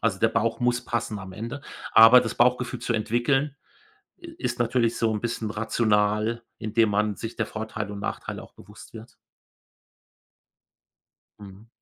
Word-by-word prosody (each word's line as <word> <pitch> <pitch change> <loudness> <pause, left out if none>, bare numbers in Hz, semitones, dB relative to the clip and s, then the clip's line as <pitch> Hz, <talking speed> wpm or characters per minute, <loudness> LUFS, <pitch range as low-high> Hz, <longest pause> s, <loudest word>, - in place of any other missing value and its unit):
Also, 110 -4 0
der 115 - +3
Bauch 115 0 0
muss 125 0 +1
passen 115 -3 -3
am 95 -1 -9
Ende, 115 +8 -6 0.3
aber 115 +3 +9
das 115 - -4
Bauchgefühl 125 0 +2
zu 115 -1 -2
entwickeln, 135 +6 0 0.6
äh, 350 - -13
ist - - -2
natürlich 120 -1 +1
so 115 -1 +1
’n 105 - -3
bisschen 115 -2 -3
rational, 110 0 +1 0.2
indem 110 0 +1
man 105 0 0
sich 115 - -6
der 110 - -1
Vorteile 110 -1 -5
und 100 - -7
Nachteile 100 - -5
auch - - -16
bewusst - - -15
wird. - - -11 2.3
Mhm. 100 +2 -13
115 Hz, 150 wpm, -25 LUFS, 105-120 Hz, 2.3 s, aber